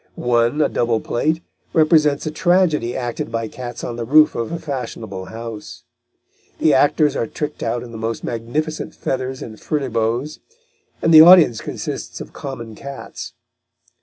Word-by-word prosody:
One, 120 +4 +2
a - - +3
double 115 -2 0
plate, 155 +10 -1 0.3
represents 155 -3 +3
a 155 - -2
tragedy 160 -7 +2
acted 120 -2 -4
by 115 -1 -2
cats 120 +1 -8
on 120 -1 -4
the 120 - -3
roof 150 +6 +5
of 115 -1 -3
a 170 - -2
fashionable 115 - -6
house. 115 -1 -8 0.7
The 155 - +3
actors 145 +2 +3
are 115 - -1
tricked 150 +4 -5
out 120 +1 -2
in 120 - -10
the 110 - -8
most 115 0 -3
magnificent 135 +7 -3
feathers 130 0 -3
and 110 -2 -10
furbelows, 125 0 -1 0.6
but 165 - +2
the 155 -1 +10
audience 165 -9 +7
consists - - -5
of - - -9
common 120 -5 -7
cats. 140 +5 -8
130 Hz, 155 wpm, -20 LUFS, 115-155 Hz, 0.7 s, the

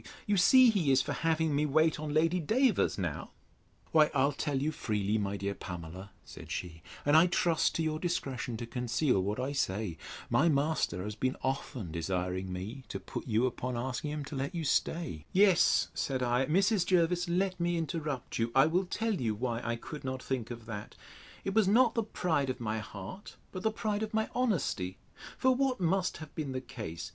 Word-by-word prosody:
You 205 - +2
see 240 +6 +7
he 175 -10 +2
is 135 - +4
for - - -3
having 160 -2 +1
me 150 +1 +2
wait 155 +2 +3
on 155 -1 -4
Lady 165 +4 +2
Davers 230 - +2
now. - - -3 0.6
Why, 155 -2 +5
I'll 140 +2 +3
tell 145 0 -2
you 150 +3 0
freely, 105 -7 -1
my 100 0 -2
dear 100 0 -2
Pamela, 90 +1 -8 0.2
said - - -11
she, 85 -2 -5 0.2
and 145 +1 +4
I 165 +3 +7
trust 170 -2 +2
to 165 - 0
your 155 -1 -1
discretion 135 -9 -2
to 120 - -5
conceal 120 -1 0
what 105 +5 -2
I 130 +2 -1
say: 95 - -2 0.3
my 165 +4 +3
master 140 - 0
has 105 +1 -4
been 130 +5 -1
often 130 - -3
desiring 90 +2 -2
me 105 +9 -6
to 95 - -5
put 95 - -7
you 115 +1 +2
upon 125 0 -2
asking 130 +4 -3
him 150 -1 -4
to 140 - -7
let 140 +7 -3
you 165 - -2
stay—— 135 - -1
Yes, 195 -2 +4
said 130 -2 -1
I, 125 +2 +1
Mrs. 190 +4 +3
Jervis, 175 -1 +2
let 185 +1 0
me 175 0 +1
interrupt 155 -6 -3
you: 115 +1 0
I 135 - +7
will 175 +4 +1
tell 225 +4 -1
you 115 - -1
why 120 +1 -2
I 115 0 -1
could 150 +6 -8
not 130 -1 -4
think 125 -4 -3
of 120 -2 -8
that: 105 -2 -7 0.5
It 195 - -2
was 215 -2 +4
not 230 +3 +5
the 230 - +1
pride 165 -10 -1
of 130 - -3
my 110 -1 -2
heart, 105 - -9 0.2
but 185 - -6
the 220 - +2
pride 215 -1 -2
of 220 0 -3
my 220 0 +1
honesty: 170 - 0 0.4
For 260 0 +4
what 260 -2 0
must 185 +1 +1
have 155 -1 -10
been 145 -4 -4
the 130 - -2
case? 110 -10 -7
140 Hz, 200 wpm, -31 LUFS, 115-175 Hz, 0.6 s, see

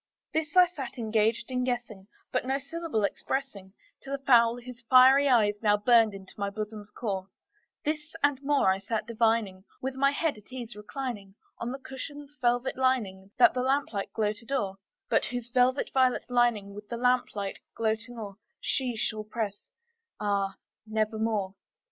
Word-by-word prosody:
This 315 0 -1
I 365 - +10
sat 275 -7 -7
engaged 225 +1 +1
in 250 0 0
guessing, 240 -6 -3 0.2
but 255 - 0
no 265 +2 0
syllable 285 -4 -3
expressing 200 -3 -3 0.3
To 270 - -11
the 275 - -1
fowl 240 -3 +4
whose 245 0 -10
fiery 265 +2 +7
eyes 220 -5 +4
now 210 -2 +4
burned 225 -1 +4
into 190 -1 -11
my 200 0 0
bosom's 210 0 -6
core; 195 -5 -3 0.6
This 300 +1 -3
and 285 -2 +3
more 280 -8 +3
I 190 - 0
sat 215 +2 -2
divining, 225 -4 +1 0.2
with 265 +1 -3
my 275 +1 +3
head 285 -1 -1
at 210 - -22
ease 240 -3 -7
reclining 210 -3 -6 0.2
On 235 - -3
the 265 - -4
cushion's 285 +2 -8
velvet 245 +1 +1
lining 215 -8 0
that 240 -2 +7
the 250 - -1
lamplight 260 -6 0
gloated 215 +3 -2
o'er, 205 -9 0 0.3
But - - +2
whose 245 -1 -5
velvet 255 +2 +2
violet 255 -2 +3
lining 235 -5 +2
with 205 +1 -10
the 235 - -3
lamplight 245 -5 0 0.2
gloating 225 +2 -2
o'er 200 -3 -7 0.2
She 255 -3 -1
shall 215 -1 -2
press, 210 -2 -4 0.5
ah, 200 -2 0 0.3
nevermore! 215 -2 0
235 Hz, 160 wpm, -28 LUFS, 210-260 Hz, 0.6 s, I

